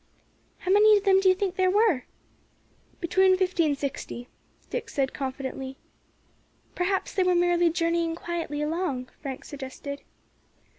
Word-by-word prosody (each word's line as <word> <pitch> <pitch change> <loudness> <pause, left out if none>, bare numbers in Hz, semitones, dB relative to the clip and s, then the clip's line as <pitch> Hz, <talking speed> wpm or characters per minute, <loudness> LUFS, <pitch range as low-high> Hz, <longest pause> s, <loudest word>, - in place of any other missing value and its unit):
"How 370 - -2
many 420 +1 +7
of 400 - -2
them 385 -2 +5
do 385 -1 +4
you 370 - +5
think 380 -1 -2
there 370 -1 +3
were?" 395 - +3 0.9
"Between 375 +2 +3
fifty 365 -3 +2
and 285 -2 0
sixty," 265 -3 -5 0.4
Dick 465 -2 -3
said 270 -7 -1
confidently. 265 0 -5 1.0
"Perhaps 380 +2 -1
they 385 - +1
were 365 -1 +3
merely 350 0 +3
journeying 335 0 0
quietly 330 -4 -3
along," 300 -5 -2
Frank 270 -3 -6
suggested. 280 0 -7
340 Hz, 140 wpm, -26 LUFS, 280-375 Hz, 1.0 s, many